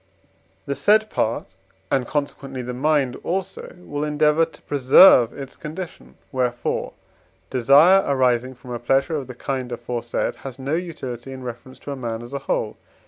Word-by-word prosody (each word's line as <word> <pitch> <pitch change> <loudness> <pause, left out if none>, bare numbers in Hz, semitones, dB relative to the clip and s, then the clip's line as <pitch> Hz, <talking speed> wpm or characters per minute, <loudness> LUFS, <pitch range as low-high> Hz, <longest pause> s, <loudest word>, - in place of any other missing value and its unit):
The 140 - -2
said 215 +7 +3
part, 110 - -1 0.5
and, 130 -3 +1
consequently, 135 -3 -3
the 125 +1 -5
mind 140 0 +1
also, 190 +1 -4
will 145 -5 -5
endeavour 150 +1 +3
to 160 - -18
preserve 130 -2 +6
its 135 -2 -9
condition. 165 +3 -8 0.2
Wherefore 125 -3 -1 0.6
desire 145 +10 +6
arising 130 -2 +1
from 125 0 -12
a 120 - -3
pleasure 135 +6 +1
of 140 -4 -4
the 125 - -9
kind 130 -1 -4
aforesaid 120 0 -3
has 135 -2 -8
no 135 +2 -3
utility 135 -8 -5
in 130 -1 -8
reference 125 +2 -8
to 145 - -6
a - - -3
man 120 -3 -4
as 120 +3 -10
a 140 - -2
whole. - - -2
135 Hz, 160 wpm, -22 LUFS, 125-150 Hz, 0.6 s, preserve